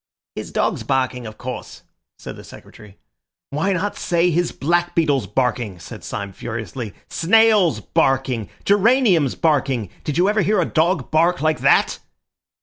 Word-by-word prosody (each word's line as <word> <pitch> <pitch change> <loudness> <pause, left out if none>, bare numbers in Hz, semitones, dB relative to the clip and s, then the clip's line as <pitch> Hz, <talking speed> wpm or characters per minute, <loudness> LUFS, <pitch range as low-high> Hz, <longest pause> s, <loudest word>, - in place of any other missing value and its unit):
"His - - -7
dogs - - 0
barking, 130 -3 -1
of 110 - -10
course," 125 0 -7 0.3
said - - -9
the - - -12
Secretary. 105 -2 -14 0.5
"Why 155 +8 0
not 195 +3 -2
say 175 0 +1
his 175 +1 0
black 175 +4 0
beetles 145 -5 +1
barking!" 120 -6 -1
said 80 -2 -11
Syme 100 -1 -5
furiously, 115 0 -6
"snails 210 -1 +3
barking! 130 -4 0 0.2
geraniums 205 - +3
barking! 135 - 0
Did 150 0 -3
you 180 +2 +3
ever 210 +1 +2
hear 205 +2 +2
a 175 - +2
dog 165 +3 0
bark 170 +3 +3
like 155 0 +1
that?" - - +3
155 Hz, 145 wpm, -20 LUFS, 125-180 Hz, 0.5 s, snails